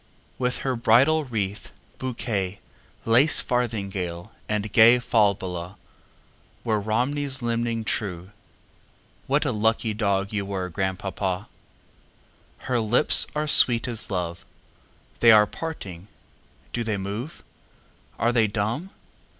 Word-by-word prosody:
With 125 0 -1
her 130 -1 0
bridal 135 +7 +3
wreath, 105 -5 -4 0.3
bouquet, 110 -7 -4 0.5
Lace 125 +7 +4
farthingale, 100 -8 -3 0.2
and 105 -1 -3
gayFalbala, 100 -6 +2 0.9
Were 110 -2 0
Romney's 130 +5 -2
limning 115 -1 -2
true, 95 -4 -3 1.0
What 145 +3 +1
a 135 - 0
lucky 110 0 0
dog 100 -1 -1
were 100 -2 -3
you, - - -7
Grandpapa! 95 +1 -3 1.2
Her 125 -2 0
lips 115 +6 +5
are 150 0 -1
sweet 120 -5 +7
as 115 -3 -3
love; 85 -3 -4 0.8
They 115 - +6
are 105 -1 +6
parting! 100 - -8 0.7
Do 120 - -2
they 110 -2 -2
move? 105 - -6 0.7
Are 120 - +1
they 115 -2 +3
dumb? 110 - -3
110 Hz, 110 wpm, -24 LUFS, 100-125 Hz, 1.2 s, sweet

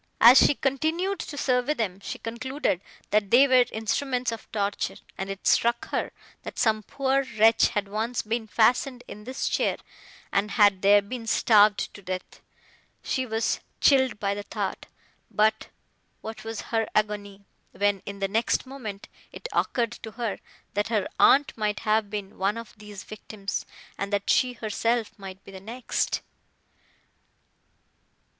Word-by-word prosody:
As 240 +3 +9
she 290 - +4
continued 320 +9 -1
to 290 - -6
survey 255 +2 +1
them, 195 -6 -2
she - - -6
concluded, 245 - -2 0.3
that 210 -1 +2
they 260 +6 +7
were 255 -2 +5
instruments 245 +3 -1
of 230 - -8
torture, 200 -1 -1 0.2
and 195 0 -5
it 195 0 -7
struck 235 0 +2
her, - - -2 0.3
that - - -8
some 220 -1 +2
poor 270 +4 0
wretch 225 +1 +6
had 205 -1 -2
once 220 +4 -2
been 220 +1 -2
fastened 245 +3 +2
in 210 +1 -10
this 260 +2 -3
chair, - - +1 0.6
and 205 +1 +1
had 205 -4 +4
there 205 +1 +6
been 230 +2 -7
starved 210 -2 +4
to 205 - -11
death. 185 -1 -6 0.6
She 260 -1 -1
was 225 0 0 0.2
chilled 260 -5 +4
by 200 0 0
the 205 - -4
thought; - - -4 0.4
but, 220 +1 +1 0.5
what 220 0 -7
was 225 -1 -5
her 225 -1 +2
agony, 205 -1 -1 0.3
when, 205 -1 0
in 200 0 -5
the 195 0 -1
next 225 +6 0
moment, 235 -7 -7 0.2
it - - -7
occurred 235 -2 0
to 220 - -8
her, 235 -3 -3 0.3
that 205 +1 0
her 215 -4 0
aunt 285 +1 +5
might 210 -2 -1
have 215 -1 +1
been 200 -1 -6
one 200 +3 +1
of 230 -1 -8
these 210 -2 -10
victims, 205 -2 -6 0.3
and 200 +1 -3
that 200 -1 +1
she 250 -1 +3
herself 230 0 -1
might 190 -1 -9
be - - -12
the 190 - -9
next! 230 +4 -2
220 Hz, 155 wpm, -26 LUFS, 205-245 Hz, 0.6 s, As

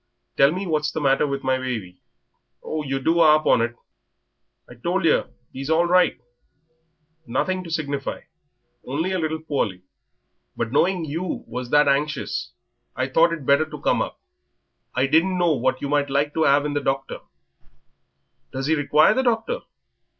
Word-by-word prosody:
Tell 140 +1 +5
me 185 +4 -3
what's 150 -3 0
the 160 - -3
matter 140 0 +2
with 140 -1 -4
my 130 0 +1
baby?" 110 -9 -5 0.7
"'Ow 155 - -3
yer 135 -2 -2
do 165 +5 +1
'arp 155 -1 +5
on - - +4
it! 120 +1 -2 0.9
I've - - -15
told - - 0
yer - - +4
that - - -29 0.2
'e's 135 +2 -6
all 165 +2 +3
right; 180 -4 +3 1.1
nothing 185 +10 -1
to 170 - -9
signify, 140 -4 -3 0.6
only 160 +8 -2
a 185 - -1
little 160 -1 -2
poorly, 105 - -2 0.7
but 115 -1 -2
knowing 175 +4 +1
you 165 +5 -4
was 125 -1 -6
that 150 +1 +4
anxious 140 - -1 0.4
I 130 +1 -2
thought 165 +5 +4
it 160 -5 -5
better 140 +4 +3
to 150 - -8
come - - +1
up. - - -4 0.8
I 130 +1 +2
didn't 165 +6 +2
know 175 -2 +3
but 135 - -2
what - - 0
you - - -1
might 145 -1 +1
like 145 +2 0
to 160 - +2
'ave 140 +1 +4
in 150 - -2
the 145 - -1
doctor." 135 0 -2 1.3
"Does 135 0 -4
he 155 - +2
require 150 +3 +4
the 260 - +1
doctor? 245 - 0
150 Hz, 175 wpm, -23 LUFS, 135-165 Hz, 1.3 s, Tell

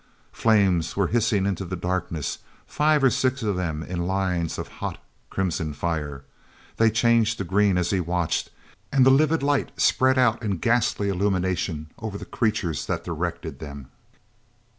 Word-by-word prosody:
Flames 95 -7 +2
were 100 -3 +2
hissing 110 -4 +2
into 95 -2 -1
the 90 0 -4
darkness, 90 -3 -3 0.3
five 150 -1 +2
or 135 - +5
six 130 0 0
of 105 -3 0
them 80 -4 -2
in 85 0 -3
lines 90 -3 -1
of - - -5
hot - - -3 0.3
crimson 85 -5 -2
fire. 75 -3 -3 0.5
They 115 0 +5
changed 115 0 +3
to - - -2
green 100 +1 +2
as 90 -1 0
he 95 - +1
watched, 85 -1 -1 0.4
and 135 -2 +4
the 130 - +7
livid 155 +2 +3
light 145 0 +1
spread 130 +1 +3
out 120 -3 +3
in 100 -5 -1
ghastly 115 0 +1
illumination 90 -5 -1
over 110 -3 -5
the - - -8
creatures 110 - -1
that - - -2
directed - - -4
them. 70 -3 -9
95 Hz, 160 wpm, -24 LUFS, 85-115 Hz, 0.5 s, the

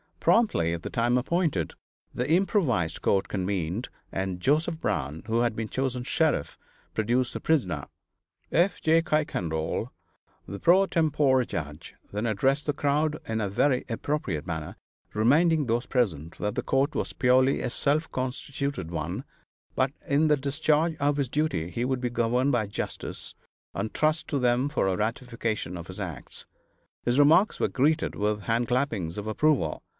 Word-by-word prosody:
Promptly 205 - +3
at 85 0 -5
the - - -4
time 120 +1 +2
appointed, 135 - 0 0.4
the 125 +3 -2
improvised 155 - +1
court 95 - +2
convened, 95 +2 -2 0.2
and 95 -1 -3
Joseph 155 - +1
Brown, 80 - -2
who 115 +1 0
had 120 -2 +1
been 110 -1 -3
chosen 130 -2 -2
sheriff, 155 - 0 0.3
produced 120 +3 0
the - - -4
prisoner. 90 - 0 0.6
F. 180 +4 +2
J. 160 +1 +4
Kuykendall, 115 - -1 0.6
the 100 +1 -6
pro 185 +3 +5
tempore 150 -7 +2
judge, 75 -6 -6 0.2
then 105 +3 -2
addressed 135 +7 +1
the 145 - +2
crowd 150 +2 +1
in 110 0 -1
a 100 - -1
very 125 +6 +2
appropriate 115 - -2
manner, 80 -3 -5 0.4
reminding 150 +8 +3
those 120 +1 0
present 85 - -1
that 105 0 -2
the - - -2
court 135 +3 +1
was - - -2
purely 130 +2 +3
a - - -1
self 150 +5 +1
constituted 130 - -3
one, 85 +1 -3 0.5
but 130 0 +2
that - - -12
in 150 +3 +4
the 150 -1 +4
discharge 150 +4 +1
of 145 0 +1
his 140 -4 0
duty 120 - -1
he 115 - -2
would 130 -1 -1
be 125 -1 -1
governed 120 +3 +1
by 115 -5 +1
justice, 100 - -6 0.4
and 110 - -3
trust 155 +1 +1
to 145 - -1
them 125 +1 +2
for 145 -9 0
a 95 -1 0
ratification 115 -4 -2
of 85 -1 -7
his 95 +2 -7
acts. 85 -9 -6 0.6
His 120 +1 +2
remarks 160 +8 +5
were - - +2
greeted 155 +4 +1
with 105 0 0
hand 115 +3 0
clappings 115 - -1
of 105 - -4
approval. 110 - +1
125 Hz, 160 wpm, -27 LUFS, 100-145 Hz, 0.6 s, pro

